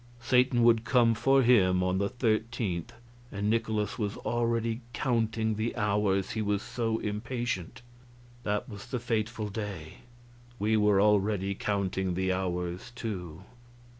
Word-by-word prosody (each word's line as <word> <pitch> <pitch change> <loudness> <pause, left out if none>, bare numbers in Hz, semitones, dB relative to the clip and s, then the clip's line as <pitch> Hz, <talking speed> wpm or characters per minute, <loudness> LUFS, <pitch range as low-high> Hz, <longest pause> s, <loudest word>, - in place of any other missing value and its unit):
Satan 125 0 +3
would 115 -1 +5
come 120 -1 +4
for 135 +5 +3
him 95 -7 +4
on 90 +1 +1
the 100 0 0
13th, 110 -6 -1 0.4
and 100 +1 -1
Nikolaus 110 -1 -1
was 105 -1 -2
already 115 0 -1
counting 110 -3 0
the 110 +2 -2
hours, 100 -2 +1
he 110 - -2
was 105 -1 0
so 115 -2 -1
impatient. 115 0 -4 0.6
That 105 -3 -2
was 105 -5 -9
the 130 - -2
fatal 115 -2 -2
day. 100 -7 -6 0.6
We 110 +1 +1
were 105 -2 +4
already 100 -1 +2
counting 95 -2 -1
the 95 0 +1
hours, 90 +3 -3
too. 95 -7 -5
105 Hz, 135 wpm, -29 LUFS, 95-115 Hz, 0.6 s, would